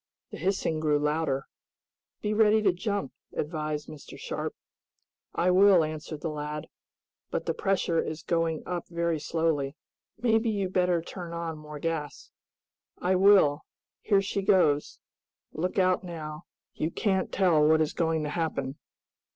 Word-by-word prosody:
The - - -7
hissing 180 -3 0
grew 150 -1 +2
louder. 150 -2 0 0.8
"Be 210 0 0
ready 215 0 +4
to 190 -3 +4
jump," 200 - -2 0.2
advised 150 -1 -3
Mr. 150 - -10
Sharp. - - -4 0.8
"I 180 +1 +3
will," 190 -2 +6
answered 155 -1 -5
the 165 - -2
lad. 150 0 -4 0.6
"But - - -2
the - - 0
pressure 190 -4 +1
is 155 +1 -5
going 165 -2 0
up 175 -2 -4
very 170 -2 -1
slowly. 155 -3 0 0.4
Maybe 225 0 +2
you'd 195 -3 -1
better 180 -2 +2
turn 175 -1 -7
on 165 -2 -4
more 150 0 -9
gas." 155 -1 -4 0.7
"I 180 +1 +1
will. 185 -6 +5 0.4
Here 200 -2 +3
she 200 0 -2
goes! 175 -7 +3 0.6
Look 180 +5 -2
out 185 -1 +3
now. 155 -3 -7 0.3
You 155 - -1
can't 190 +1 0
tell 175 -6 +4
what 160 +1 +5
is 155 -1 +1
going 160 -2 0
to 150 - -2
happen." 150 -4 -2
165 Hz, 145 wpm, -28 LUFS, 150-190 Hz, 0.8 s, will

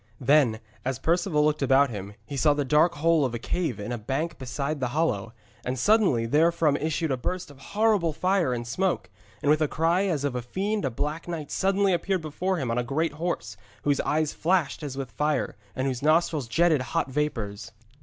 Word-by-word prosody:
Then, 130 -4 +3 0.2
as 130 -1 -2
Perceval 165 - +1
looked 150 0 +1
about 135 0 +4
him, 100 -1 -7
he 140 - -6
saw 145 +2 +3
the 145 -1 -1
dark 150 +6 +3
hole 160 +1 +3
of 125 -3 -1
a - - -1
cave 140 - -2
in 105 +4 -5
a 120 - -3
bank 140 +9 -3
beside 140 +3 -3
the 130 - 0
hollow, 115 -10 0 0.3
and 125 +1 -2
suddenly 185 - +3
therefrom 155 +3 +3
issued 160 +1 -1
a 130 - 0
burst 180 +5 -4
of 140 - -16
horrible 210 -1 +1
fire 180 -1 +1
and 120 -1 -3
smoke, 170 - -1 0.3
and 145 - +4
with 155 +1 +3
a 155 - +3
cry 170 +6 +1
as 155 -7 -1
of 145 -3 0
a 125 - -2
fiend 195 - -2
a - - +1
black 150 +8 -3
knight 160 -4 -5
suddenly 195 0 +2
appeared 185 0 0
before 180 +5 -2
him 130 -7 -2
on 120 - 0
a - - 0
great 145 +5 -1
horse, 150 -9 -3 0.3
whose 145 -1 +2
eyes 155 0 0
flashed 170 -3 0
as 140 -3 -5
with 135 -4 -5
fire 150 +4 -1 0.2
and 130 - -1
whose 130 -2 -2
nostrils 155 -3 +2
jetted 160 +3 +3
hot 130 +1 -2
vapours. 115 -9 -3
150 Hz, 205 wpm, -26 LUFS, 130-170 Hz, 0.3 s, about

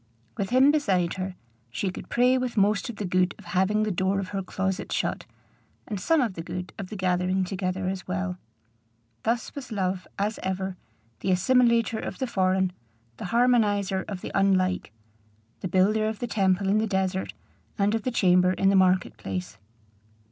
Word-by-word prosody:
With 195 - -2
him 260 +4 +6
beside 190 - +1
her, 185 0 -4 0.3
she 185 +11 -2
could - - -9
pray 250 +2 +4
with 250 -2 -2
most 205 +2 +2
of 235 - -5
the 205 - -4
good 180 0 +1
of 205 - -15
having 190 +4 +1
the 215 - 0
door 190 +2 +1
of 190 -2 -4
her 195 -1 -2
closet 190 0 -3
shut, - - -2 0.6
and 205 -3 -3
some 320 - +3
of 230 -6 0
the 165 - -6
good 180 +2 -6
of 200 - -4
the 215 - -6
gathering 185 0 +1
together 185 0 -2
as 190 -1 -4
well. 185 0 -3 0.8
Thus 230 0 -1
was 265 -4 -8
love, 185 -3 -2
as 205 +2 -1
ever, 190 0 -2 0.4
the 190 - -2
assimilator 230 +3 +3
of - - -5
the 260 - -1
foreign, 190 -4 +1 0.4
the - - -6
harmonizer 205 -4 +2
of 195 -3 -5
the - - -6
unlike; 185 - +2 0.7
the - - -3
builder 205 +5 +2
of 220 -1 -3
the 240 - -3
temple 195 -4 +1
in 205 +2 +3
the 220 - 0
desert, 190 -1 -1 0.4
and 205 0 +2
of 225 - 0
the 255 - -1
chamber 185 -5 +4
in 195 +1 +2
the 195 - +3
market 185 -1 +3
place. 95 +2 -5
190 Hz, 185 wpm, -26 LUFS, 185-215 Hz, 0.8 s, him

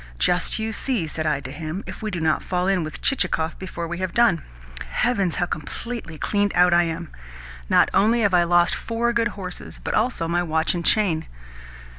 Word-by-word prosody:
'Just 175 - +2
you 220 0 -3
see,' 240 -10 0
said 155 0 -3
I 150 - 0
to 130 - -7
him, 160 +6 -5
'if - - -8
we 215 - -2
do 180 -4 -3
not 160 -1 +1
fall 180 -1 -1
in 190 -3 +2
with 155 - -7
Chichikov 165 -11 0
before 170 -2 -5
we 175 +1 -5
have 185 -1 -3
done.' 230 -9 +4 0.5
Heavens, 200 - +1
how 175 - +1
completely 170 +3 -6
cleaned 205 +4 0
out 180 0 +5
I 175 0 +5
am! 165 0 -5 0.6
Not - - +5
only 225 +4 +3
have 200 -3 +2
I 175 - +6
lost 175 0 +3
four 235 +1 -1
good 235 0 +2
horses, 185 -2 -7
but - - -2
also 215 -7 +1
my 175 +1 +1
watch 160 -1 0
and 175 -1 -3
chain." 170 -5 +2
180 Hz, 200 wpm, -23 LUFS, 165-215 Hz, 0.6 s, I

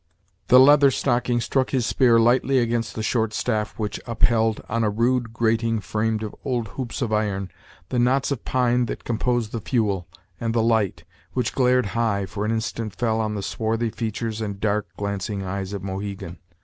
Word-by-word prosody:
The 125 - +8
Leather 140 +1 +7
Stocking 125 -2 +1
struck 130 +2 0
his 130 -4 0
spear 120 -3 +4
lightly 125 +3 +3
against 115 -2 0
the 110 - -3
short 110 -1 0
staff 110 -3 -1
which 105 -1 -3
up 115 -1 -3
held, 115 -2 +3
on 115 +1 0
a 105 - +2
rude 120 +2 +1
grating 115 0 +1
framed 110 +1 -1
of 105 - -5
old 120 -5 -2
hoops 125 +1 -4
of 110 -3 -2
iron, 100 -3 -1 0.4
the 125 - 0
knots 130 +3 +2
of 140 - -3
pine 125 -1 +1
that - - -5
composed 120 -1 -1
the 115 - -4
fuel, 100 -8 0 0.3
and 115 -1 -2
the 115 - +3
light, 110 -4 +1 0.3
which 125 -3 -1
glared 125 -1 +3
high, 110 -4 0
for 100 +2 -4
an 110 - 0
instant 110 -2 -3
fell 110 0 0
on 105 -1 -2
the 100 - -4
swarthy 115 +2 -1
features 110 0 -3
and 100 -2 -4
dark, 105 0 0
glancing 100 0 -3
eyes 95 +1 -4
of 100 -2 -5
Mohegan. 95 -2 -5
115 Hz, 190 wpm, -23 LUFS, 105-120 Hz, 0.4 s, The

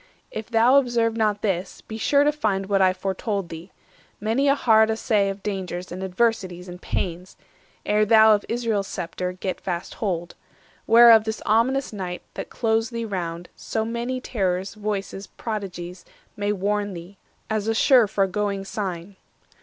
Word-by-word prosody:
If 220 +1 -6
thou 235 +3 +5
observe 235 -4 +2
not 215 -2 0
this, 190 -3 -2
be 220 0 -8
sure 280 +5 +3
to 295 - +3
find 210 -10 -1
What 195 0 +1
I 185 -1 +5
foretold 195 0 -3
thee—many 215 - -4
a 275 - +5
hard 220 -5 +4
assay 215 -2 +1
Of 195 0 -6
dangers, 185 -3 -4
and 185 +2 -6
adversities, 190 -2 -1
and 180 0 -9
pains, 180 +1 -4 0.5
Ere 210 +1 +3
thou 220 0 +6
of 205 - +1
Israel's 225 -4 -1
sceptre 180 +1 -4
get 185 +1 -4
fast 175 -2 -4
hold; 175 -5 -3 0.5
480 - - -9
Whereof 230 -1 +8
this 220 0 -3
ominous 240 +5 +2
night 180 -3 -5
that - - -6
closed 225 0 0
thee 230 -1 -3
round, 175 -4 -4
So 220 -1 -3
many 235 +3 -3
terrors, 190 -6 -2
voices, 200 -2 -4
prodigies, 180 -5 -6 0.3
May 205 -1 -1
warn 205 0 -1
thee, 175 +3 -11 0.3
as 215 -1 -2
a 225 - +1
sure 245 -1 +5
foregoing 200 0 -1
sign." 190 -2 -5
205 Hz, 160 wpm, -24 LUFS, 185-225 Hz, 0.5 s, Whereof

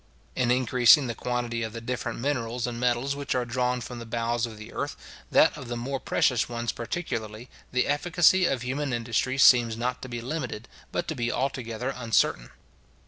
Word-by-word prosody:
In 125 -2 +1
increasing 125 +3 +5
the 120 - -2
quantity 120 0 -2
of 110 -1 -4
the 115 - -5
different 120 0 -4
minerals 120 -2 -2
and 120 -1 -4
metals 125 +3 +1
which 140 -2 -3
are 125 -1 0
drawn 125 +1 -1
from 120 +1 -7
the 115 - -7
bowels 115 0 -1
of 110 -2 -10
the 105 - -11
earth, - - -3 0.3
that - - +5
of 130 - -8
the 120 0 -4
more 135 +3 -3
precious 125 -3 +1
ones 120 -1 -2
particularly, 115 -4 -5 0.2
the 125 0 +2
efficacy 175 +4 +3
of 125 -3 -1
human 135 +1 -2
industry 120 +2 -1
seems 120 -3 +6
not 125 +1 -2
to 130 - -7
be 120 -1 -4
limited, 125 -3 -4 0.2
but 175 - -2
to - - -1
be 120 -4 -1
altogether 125 -1 -2
uncertain. 115 - +1
120 Hz, 190 wpm, -27 LUFS, 115-130 Hz, 0.3 s, seems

